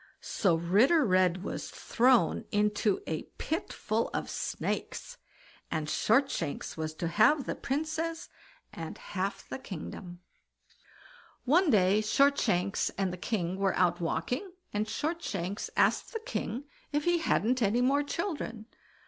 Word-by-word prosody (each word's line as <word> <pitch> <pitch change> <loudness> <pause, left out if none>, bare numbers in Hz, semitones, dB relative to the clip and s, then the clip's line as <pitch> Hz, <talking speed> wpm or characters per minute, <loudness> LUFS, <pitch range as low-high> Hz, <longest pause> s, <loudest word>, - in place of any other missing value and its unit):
So 190 -6 +2
Ritter 215 - +4
Red 185 -2 +3
was - - -4
thrown 250 +1 +2
into 210 0 +1
a 160 -1 -2 0.2
pit 320 +2 -2
full 220 +2 -1
of - - -2
snakes, - - -3 0.5
and 155 -2 -2
Shortshanks 220 - +1
was 155 0 -4
to 170 - -2
have 235 - +4
the - - -2
Princess 320 +4 -2 0.5
and 165 -1 -6
half 195 +1 -4
the - - -5
kingdom. 175 -3 -8 1.2
One 330 +7 +4
day 200 -3 +4
Shortshanks 215 -6 +2
and 190 -2 0
the - - -3
king 185 -2 -2
were 195 -1 +1
out 180 -1 +2
walking, 245 - -2 0.2
and 210 +1 0
Shortshanks 210 - -3
asked - - +2
the 450 - -2
king 425 - -4 0.3
if 295 0 0
he 345 +1 +3
hadn't 255 -5 +1
any 220 +3 +3
more 275 +3 +3
children? 290 - -3
215 Hz, 130 wpm, -30 LUFS, 185-285 Hz, 1.2 s, Ritter